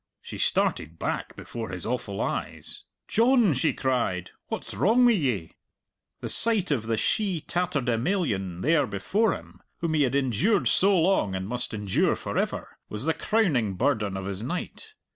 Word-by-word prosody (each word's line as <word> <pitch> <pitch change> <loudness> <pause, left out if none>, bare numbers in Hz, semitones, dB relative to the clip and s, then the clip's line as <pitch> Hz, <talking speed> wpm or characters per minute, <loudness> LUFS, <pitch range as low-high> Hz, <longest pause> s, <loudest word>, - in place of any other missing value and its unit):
She - - -9
started 80 +1 0
back - - -3
before 115 -3 -6
his 90 -2 -5
awful 110 -4 -3
eyes. - - -3 0.2
"John!" 235 - +4
she 130 - +2
cried, 115 -9 -1 0.2
"what's - - -4
wrong 240 +5 +4
wi' 240 - +7
ye?" 125 - 0 0.7
The - - -3
sight 220 -7 +3
of 115 -6 0
the 115 -1 0
she 195 - +1
tatterdemalion 125 - -1
there 150 -2 +3
before 195 - +1
him, - - -13 0.2
whom 165 -2 -1
he 155 - +2
had 135 -1 +2
endured 140 - +2
so 195 0 +4
long 165 - +2
and 95 0 -3
must 120 +2 -3
endure 105 -4 +1
for - - -6
ever, - - -2
was 105 +5 -3
the 160 - +2
crowning 145 - +1
burden 105 -5 0
of 95 - -5
his 100 0 -4
night. 180 - -5
130 Hz, 160 wpm, -26 LUFS, -, 0.7 s, wi